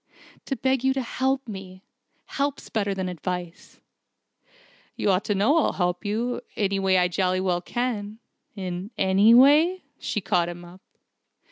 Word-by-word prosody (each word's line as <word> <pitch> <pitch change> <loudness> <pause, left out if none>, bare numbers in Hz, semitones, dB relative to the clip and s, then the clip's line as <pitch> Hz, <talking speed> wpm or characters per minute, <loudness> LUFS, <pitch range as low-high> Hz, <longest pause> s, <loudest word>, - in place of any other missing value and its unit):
"To 270 - -2
beg 265 -1 0
you 265 0 +3
to 270 - 0
help 265 +2 -1
me. 190 -2 -9 0.4
Help's 280 0 -3
better 200 -3 -1
than 190 -1 -3
advice." 180 0 -6 1.2
"You 200 - +1
ought 185 +1 +1
to 205 - 0
know 240 +12 +3
I'll - - +1
help 180 -1 -1
you, 230 +4 -1 0.2
in - - -2
any 195 0 +1
way 190 -1 +3
I 180 0 +3
jolly 185 +1 0
well 180 -2 0
can 220 -1 -3 0.2
" - - -53
"In 185 0 -5
any 200 +5 +5
way?" 305 +8 +5 0.2
she 210 - -2
caught 180 -3 0
him 175 0 -9
up. 180 +2 -14
200 Hz, 165 wpm, -25 LUFS, 185-245 Hz, 1.2 s, any